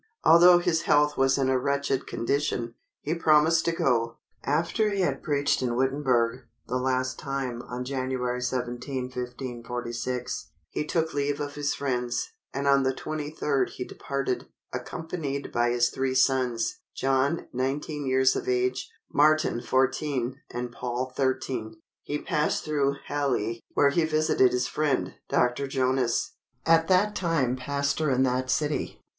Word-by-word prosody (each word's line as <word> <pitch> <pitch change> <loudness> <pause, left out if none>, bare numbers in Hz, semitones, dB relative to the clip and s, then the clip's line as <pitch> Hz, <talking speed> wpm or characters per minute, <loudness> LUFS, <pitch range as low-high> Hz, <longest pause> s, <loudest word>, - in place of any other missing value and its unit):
Although 175 +2 +8
his 175 -2 +1
health 150 0 +4
was 135 0 +3
in 135 -1 +1
a 130 -1 +2
wretched 140 0 -1
condition, 120 -2 -1 0.3
he 155 - -1
promised 160 0 +4
to 170 - +2
go. 115 -7 +1 0.3
After 170 +9 +1
he 200 -1 -1
had 140 -6 0
preached 140 -2 +1
in 120 -2 0
Wittenberg, 130 -2 +1 0.2
the 125 - -1
last 130 0 -1
time, 135 -3 -3
on 125 0 -5
January 130 -2 -2
17, 125 +1 -3
1546, 125 0 -4 0.2
he 150 - -3
took 160 -1 0
leave 145 0 -1
of 145 -1 -4
his 145 -1 -1
friends, 125 -3 -2 0.2
and 140 +1 -2
on 140 0 +5
the 130 0 0
23d, 150 -3 -1
he 125 - -6
departed, 140 -2 -3 0.3
accompanied 160 -4 -4
by 120 0 +2
his 120 0 +2
three 130 0 -1
sons; 130 - +1 0.2
John, 135 +4 +1
19 140 +3 -2
years 130 0 +3
of - - -3
age, 125 +1 0 0.2
Martin 155 -4 +3
14, 130 -1 0
and 120 0 -4
Paul 125 +1 -4
13. 130 -4 -2 0.2
He 145 - -3
passed 150 0 -1
through 140 -2 +1
Halle, 125 -6 -1 0.2
where 140 -1 +5
he 165 +2 +2
visited 155 -5 +3
his 125 0 0
friend, 150 -4 0 0.2
Dr. 125 +3 +1
Jonas, 130 -3 0 0.3
at 165 0 +4
that 200 +3 +3
time 165 -8 +1
pastor 140 +3 -1
in 130 0 +3
that 130 0 0
city. 150 +3 -1
135 Hz, 145 wpm, -27 LUFS, 125-150 Hz, 0.3 s, Although